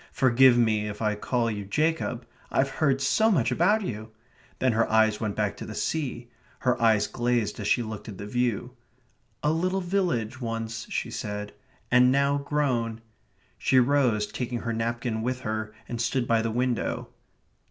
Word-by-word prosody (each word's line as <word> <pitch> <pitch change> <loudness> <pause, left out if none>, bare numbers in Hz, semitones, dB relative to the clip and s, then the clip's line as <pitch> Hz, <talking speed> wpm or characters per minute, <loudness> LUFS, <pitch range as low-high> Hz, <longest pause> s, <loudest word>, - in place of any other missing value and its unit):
"Forgive 130 -1 +5
me 110 -3 +2
if 105 0 -6
I 105 -1 +1
call 115 +2 -1
you 105 -1 -4
Jacob. 125 +1 -1 0.2
I've 135 +1 +1
heard 135 -3 +3
so 220 +11 +3
much 130 - +2
of 200 - +3
you." 110 - -5 0.5
Then 130 - +2
her 115 +1 +1
eyes 110 -1 +3
went 105 -2 -2
back 105 -2 -1
to - - -7
the 110 - -7
sea. 125 -6 -3 0.3
Her 125 -2 +1
eyes 110 -2 +4
glazed 120 -3 -1
as 105 - -3
she 120 - +2
looked 110 0 -7
at 100 - -8
the 100 - -6
view. 120 +1 -1 0.7
"A 150 - +3
little 185 +4 0
village 175 - -1
once," 115 -1 -4
she - - -3
said, 105 0 -5 0.4
"and 125 +1 +6
now 140 +1 +2
grown...." 125 -6 -1 0.6
She 130 - +2
rose, 125 -5 +3
taking 120 +1 -4
her 115 - -2
napkin 115 0 -2
with 125 +2 -2
her, 110 -1 -3 0.2
and 120 -1 -4
stood 120 +1 0
by 115 -1 +3
the 115 - -1
window. 120 +1 -1
120 Hz, 175 wpm, -26 LUFS, 110-130 Hz, 0.7 s, and